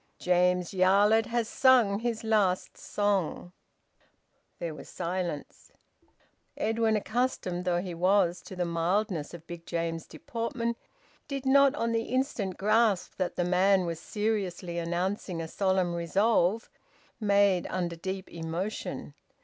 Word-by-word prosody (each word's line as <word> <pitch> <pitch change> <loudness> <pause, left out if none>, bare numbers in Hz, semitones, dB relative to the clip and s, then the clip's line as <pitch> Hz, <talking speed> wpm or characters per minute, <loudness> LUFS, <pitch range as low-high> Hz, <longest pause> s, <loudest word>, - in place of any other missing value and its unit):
James 180 0 +2
Yarlett 200 +4 +4
has 235 -1 -1
sung 235 -6 +4
his 230 -1 -2
last 205 -5 +1
song." 195 -4 -1 1.1
There 170 -2 -4
was 150 - -11
silence. 175 -3 -4 0.9
Edwin, 225 0 +1
accustomed 210 -5 -1
though 175 -1 +1
he 180 -2 -5
was 180 0 +2
to 190 - -8
the 180 -1 -1
mildness 170 0 -1
of 165 -1 -12
Big 170 -1 -9
James's 165 -1 -3
deportment, 235 0 -3 0.5
did 275 -2 -4
not 275 +1 +5
on 230 -4 -1
the 230 0 0
instant 240 -8 -1
grasp 215 -1 +2
that 185 - -2
the 175 - 0
man 185 +1 +3
was 165 -2 -3
seriously 190 -5 -2
announcing 175 +1 -2
a 165 - -4
solemn 185 -1 +1
resolve 195 +4 +1 0.5
made 200 -4 +3
under 175 -2 -2
deep 190 +3 -5
emotion. 170 +5 -5
190 Hz, 125 wpm, -29 LUFS, 175-220 Hz, 1.1 s, not